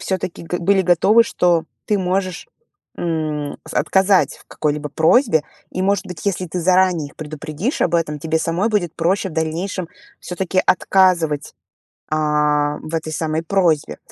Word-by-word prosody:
всё-таки 185 -3 -3
г 175 +2 -3
были 190 +2 +2
готовы, 190 +6 +5
что 175 -7 +2 0.2
ты 210 -2 +1
можешь, 185 - -2 0.5
м, 155 -3 -3
с - - -8
отказать 190 +5 +2
в - - -21
какой-либо 150 0 -2
просьбе. 160 - +3 0.3
И, 185 - -3
может 200 0 +1
быть, 180 -1 -8
если 185 -2 -1
ты 175 +2 -4
заранее 180 -3 +2
их - - -21
предупредишь 155 - -4
об - - +1
этом, 155 -3 0
тебе 160 0 0
самой 170 +7 0
будет 175 -6 0
проще 190 +4 +1
в - - -11
дальнейшем 165 +3 -2 0.3
всё-таки 185 +1 -1
отказывать, 175 -6 +2 0.6
а, 150 -1 +1
в 160 +1 -5
этой 160 -1 -3
самой 160 0 -2
просьбе. 165 -4 +1
170 Hz, 155 wpm, -20 LUFS, 155-185 Hz, 0.6 s, готовы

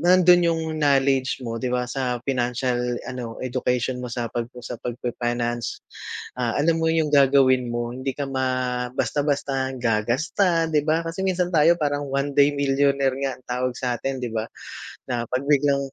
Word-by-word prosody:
nandun 180 -1 +6
'yong 165 -1 0 0.2
knowledge 135 -2 +2
mo, 115 -1 -4
'di 130 - -2
ba, 125 0 0
sa 125 -1 -3
financial 125 -1 -1
ano, 125 -3 -6
education 125 0 -1
mo 125 - -5
sa 120 -1 -4
pag 120 -1 -2 0.2
sa 115 - -6
pag-fi-finance. 120 0 -3 0.6
Ah, 120 -2 0
alam 165 +2 +2
mo 160 - +1
'yong 160 -2 +1
gagawin 135 -3 +5
mo 120 0 -2
hindi 130 +1 -3
ka 145 - -3
ma 130 -2 -1
basta-basta 140 -2 0
gagasta, 135 - +1
'di 150 -1 +3
ba? 160 +2 +2
Kasi 165 +2 -6
minsan 180 -1 0
tayo, 165 0 +5
parang, 145 -1 -1
one 140 +1 -1
day 145 0 +5
millionaire 140 -1 +2
nga, 135 -1 -1
ang - - -24
tawag 125 0 -1
sa 125 - -3
atin, 135 -1 -3
'di 120 - -3
ba? 110 0 -2 0.6
Na 120 -2 -1
'pag 130 +2 0
biglang 145 -1 +3
130 Hz, 170 wpm, -24 LUFS, 125-145 Hz, 0.6 s, nandun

